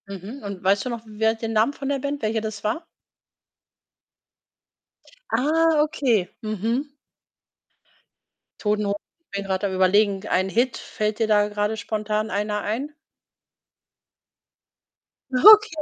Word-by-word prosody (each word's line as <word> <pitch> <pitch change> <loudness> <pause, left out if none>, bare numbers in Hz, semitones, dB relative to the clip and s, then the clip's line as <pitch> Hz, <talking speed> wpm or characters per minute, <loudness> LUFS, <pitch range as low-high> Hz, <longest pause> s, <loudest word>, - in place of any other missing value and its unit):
Mhm. 200 +7 -8
Und 200 -2 -7
weißt 195 +3 +2
du - - -2
noch, 235 -2 -4
wer 220 +1 0
den 225 0 -4
Namen 225 +6 +2
von 275 -1 -5
der 280 -1 0
Band, 285 +1 -3
welche 220 0 -1
das 215 -2 -6
war? 235 +11 -2 2.4
Ah, 310 +5 +3
okay. 245 - +1
Mhm. 225 +7 -2 1.7
„Toten 210 0 0
Ho“ 200 0 0 0.4
bin 200 0 -4
grad 190 0 -2
am 195 -2 -1
überlegen, 195 +2 +2
ein 185 +1 +1
Hit, 240 +5 +1
fällt 215 0 -3
dir 225 - +2
da 210 -1 +3
grade 210 +1 -2
spontan 215 +1 -2
einer 210 +1 -1
ein? 260 +8 -3 2.4
Okay. 420 - +7
215 Hz, 125 wpm, -23 LUFS, 205-255 Hz, 2.4 s, Okay